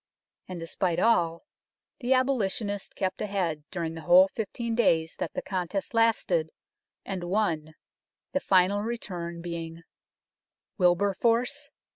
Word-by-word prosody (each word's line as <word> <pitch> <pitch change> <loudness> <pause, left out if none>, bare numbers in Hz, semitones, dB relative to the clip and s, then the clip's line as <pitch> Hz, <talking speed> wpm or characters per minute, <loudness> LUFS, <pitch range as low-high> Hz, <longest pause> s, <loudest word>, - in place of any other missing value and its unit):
And, 185 -2 -6
despite 165 +1 -1
all, 170 -7 +2 0.6
the 250 0 -2
abolitionist 215 -6 -1
kept 190 -1 -2
ahead 180 -7 -1
during 170 -3 -3
the 165 - -7
whole 180 +4 +6
fifteen 230 +1 -3
days 165 -8 +2
that - - -4
the - - -3
contest 190 +2 -3
lasted, 215 -8 +2 0.6
and 185 -3 -4
won, 170 -5 -1 0.6
the 280 - +1
final 195 -2 +3
return 175 -7 -5
being: 165 -1 -6 1.0
Wilberforce 230 +10 +2
185 Hz, 115 wpm, -28 LUFS, 170-220 Hz, 1.0 s, whole